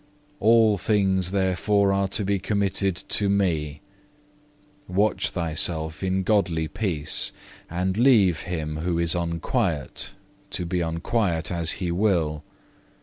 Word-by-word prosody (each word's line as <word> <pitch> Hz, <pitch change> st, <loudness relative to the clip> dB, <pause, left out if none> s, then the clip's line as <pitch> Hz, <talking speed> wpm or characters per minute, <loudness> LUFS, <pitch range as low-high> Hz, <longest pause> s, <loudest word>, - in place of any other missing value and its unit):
All 110 Hz, -2 st, +4 dB
things 95 Hz, -4 st, +1 dB
therefore 100 Hz, +1 st, +1 dB
are 100 Hz, 0 st, +1 dB
to 100 Hz, +1 st, -1 dB
be 100 Hz, 0 st, 0 dB
committed 100 Hz, -1 st, 0 dB
to 100 Hz, -1 st, +2 dB
Me; 80 Hz, -7 st, 0 dB, 1.1 s
watch 100 Hz, +4 st, 0 dB
thou 85 Hz, -3 st, -2 dB
thyself 80 Hz, 0 st, 0 dB
in 95 Hz, 0 st, 0 dB
godly 90 Hz, -6 st, +1 dB
peace, 80 Hz, -7 st, -1 dB, 0.4 s
and 90 Hz, +2 st, -1 dB
leave 110 Hz, -8 st, +4 dB
him 80 Hz, -3 st, -4 dB
who 85 Hz, +1 st, -1 dB
is 85 Hz, -1 st, +3 dB
unquiet 85 Hz, -, -2 dB, 0.3 s
to 90 Hz, -, -3 dB
be 90 Hz, +1 st, -1 dB
unquiet 85 Hz, +1 st, -1 dB
as 85 Hz, -2 st, +1 dB
he 90 Hz, -3 st, -3 dB
will. 85 Hz, -6 st, 0 dB
90 Hz, 125 wpm, -24 LUFS, 85-100 Hz, 1.1 s, All